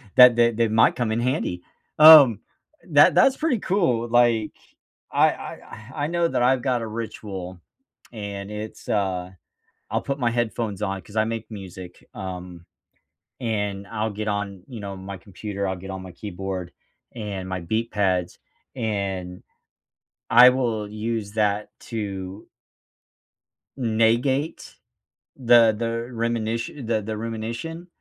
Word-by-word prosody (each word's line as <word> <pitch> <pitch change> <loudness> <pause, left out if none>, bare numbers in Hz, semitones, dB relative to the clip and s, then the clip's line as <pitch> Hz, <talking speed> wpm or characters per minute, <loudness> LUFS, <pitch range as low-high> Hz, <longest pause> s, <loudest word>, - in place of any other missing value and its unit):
that 125 -2 +9
that 120 -1 +3
that 115 -2 +2
might 110 +1 +4
come 120 -3 -1
in 110 - 0
handy. 120 - -1 0.3
Um, 150 -8 +9 0.5
that 145 -1 +6
that's 270 0 +5
pretty 300 -8 0
cool. 170 - +1
Like, 120 -2 +3 0.6
I - - +4
I 110 +3 -10
I 145 -1 -1
know 170 +1 +1
that 125 - 0
I've 125 0 +3
got 125 -2 0
a 115 - -4
ritual, 100 -5 -6 0.5
and, 100 -2 -6
it's, 105 +1 -8
uh, 95 -3 -1 0.6
I'll - - -1
put 140 +1 -3
my 120 -3 +1
headphones 115 -3 -2
on, 95 -2 -2
'cause 100 - -16
I 110 - +4
make 115 0 -4
music, 95 -3 -10
um, 90 -2 -7 0.7
and 105 -4 -2
I'll 110 0 -2
get 105 +1 -4
on, 100 -2 -3
you 120 -5 -8
know, 100 -1 -6
my 95 +1 -7
computer, 100 +2 -5
I'll 95 - -2
get 95 +2 -10
on 95 -1 -6
my 95 -1 -10
keyboard 95 -1 -6 0.5
and 100 -4 -5
my 95 -1 -3
beat 110 +7 -2
pads, 95 -4 0 0.4
and 100 -6 -3 0.9
I 120 +2 +9
will 115 -5 -1
use 110 -1 -3
that 105 -1 0
to 100 -3 -6 1.3
negate 120 +5 0 0.6
the 120 -3 +5
the 115 +1 -2
reminit 115 +2 -2
the 110 -2 +1
the 110 +1 -5
rumination 115 +10 -5
110 Hz, 140 wpm, -24 LUFS, 100-120 Hz, 1.3 s, that